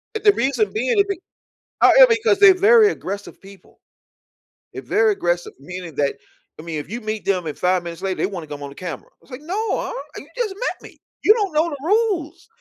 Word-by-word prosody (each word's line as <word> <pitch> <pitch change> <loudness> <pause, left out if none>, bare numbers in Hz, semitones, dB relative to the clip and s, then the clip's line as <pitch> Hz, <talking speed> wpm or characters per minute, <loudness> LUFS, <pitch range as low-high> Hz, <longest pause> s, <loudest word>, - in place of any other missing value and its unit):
and 435 - -4
the 410 - +7
reason 235 - 0
being 250 - 0
it 400 0 +3
b 395 - -3 0.6
however - - +8
because 445 -2 +2
they're 395 -2 +8
very 420 +3 +5
aggressive 200 - -7
people. 195 0 -17 0.9
They're - - -6
very 430 +1 +2
aggressive, 175 - -2
meaning 175 +1 -9
that 140 -1 0 0.4
I - - -9
mean, 160 -3 -4
if 145 - -9
you 235 +2 -5
meet 215 0 -5
them 185 -4 0
and 150 - -5
5 180 0 +1
minutes 170 +1 -8
later, 190 -1 -2
they - - 0
wanna 180 -5 -6
come 145 -1 -8
on 140 - -6
the 140 - -14
camera. 170 -6 -7
I - - -33
was - - -23
like, 250 - -8
"No, 395 +8 -2
um, - - -4 0.2
you - - -10
just 430 -6 -2
met - - -5
me. - - -23 0.2
You 425 - +7
don't 410 -7 -2
know 315 +3 +2
the 285 - -6
rules." 385 -6 0
250 Hz, 225 wpm, -21 LUFS, -, 0.9 s, however